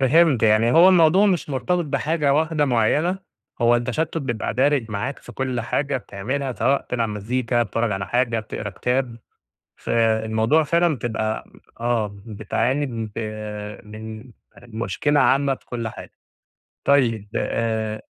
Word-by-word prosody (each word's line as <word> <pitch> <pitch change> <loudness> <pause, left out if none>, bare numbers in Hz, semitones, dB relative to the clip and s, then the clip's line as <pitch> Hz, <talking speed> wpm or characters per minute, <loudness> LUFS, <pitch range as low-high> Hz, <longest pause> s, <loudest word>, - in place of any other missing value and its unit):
فهمت، 140 -1 +4
يعني 110 +2 +4
هو 170 +3 +7
الموضوع 180 +3 +5
مش 180 -6 0
مرتبط 160 +7 0
بحاجة 150 0 0
واحدة 155 -1 +1
معيّنة 145 - +1 0.4
هو 120 0 +5
التشتُّت 145 +7 -2
بيبقى 120 -7 -3
دارج 130 -3 +2
معاك 110 +7 -3
في - - -13
كُلّ 130 -2 -2
حاجة 140 +4 -1
بتعملها، 125 +6 -4
سواء 135 +3 +1
بتلعب 115 -3 -2
مزيكا، 120 +3 -1
بتتفرّج 115 +1 -1
على 95 -1 -3
حاجة، 120 0 +1
بتقرا 105 -1 -6
كتاب، 125 +3 -2 0.6
فالموضوع 110 +5 +2
فعلًا 170 +1 +2
بتبقى 110 -2 -2 0.4
آه 110 -4 -1
بتعاني 115 +6 -1
ب 115 -4 -5 0.7
من 110 +3 -9 0.3
مشكلة 120 +5 -1
عامة 140 0 +3
بكُلّ 120 -3 -6
حاجة، - - -10 0.7
طيّب 115 -7 +2
آآ 110 -1 -1
120 Hz, 130 wpm, -22 LUFS, 110-145 Hz, 0.7 s, هو